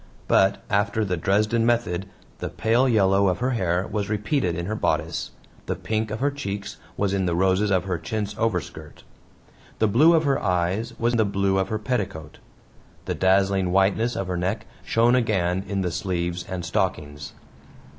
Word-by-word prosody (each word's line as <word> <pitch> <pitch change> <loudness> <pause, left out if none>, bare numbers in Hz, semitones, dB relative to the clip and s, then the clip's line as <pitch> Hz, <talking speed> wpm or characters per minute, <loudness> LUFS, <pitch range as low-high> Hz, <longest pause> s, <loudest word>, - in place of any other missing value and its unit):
But, 95 +1 +3
after 100 +2 +1
the 90 -2 -1
Dresden 105 +6 +1
method, 110 -6 0 0.3
the - - -4
pale 120 +4 +2
yellow 100 -3 +3
of 90 - +1
her 125 +2 -1
hair 90 -5 0
was 105 -2 -3
repeated 105 - 0
in 85 0 -3
her 105 - -3
bodice, 110 - -1 0.4
the - - -1
pink 110 0 -2
of 110 +3 -5
her 145 +1 +2
cheeks 100 -8 -5 0.2
was 100 -1 0
in 95 -2 0
the 85 - 0
roses 95 +3 +2
of 95 -2 +2
her 90 -3 -2
chintz 105 +5 -3
overskirt. 90 -8 -3 0.7
The 110 - +2
blue 150 +11 +5
of 160 - +3
her 140 -2 +1
eyes 90 +3 -1
was 120 +1 +1
the 115 -2 +3
blue 100 -1 +1
of 95 0 -1
her 110 - -1
petticoat; 105 - -4 0.7
the - - -2
dazzling 95 -1 +2
whiteness 100 +5 +2
of 95 - -2
her 90 -1 -3
neck 100 +6 -2 0.2
shone 115 +2 +3
again 95 -7 +1
in 100 -1 -1
the 90 -2 -1
sleeves 85 -1 -2
and 90 -2 -4
stockings. 75 -3 -2
100 Hz, 175 wpm, -24 LUFS, 90-110 Hz, 0.7 s, blue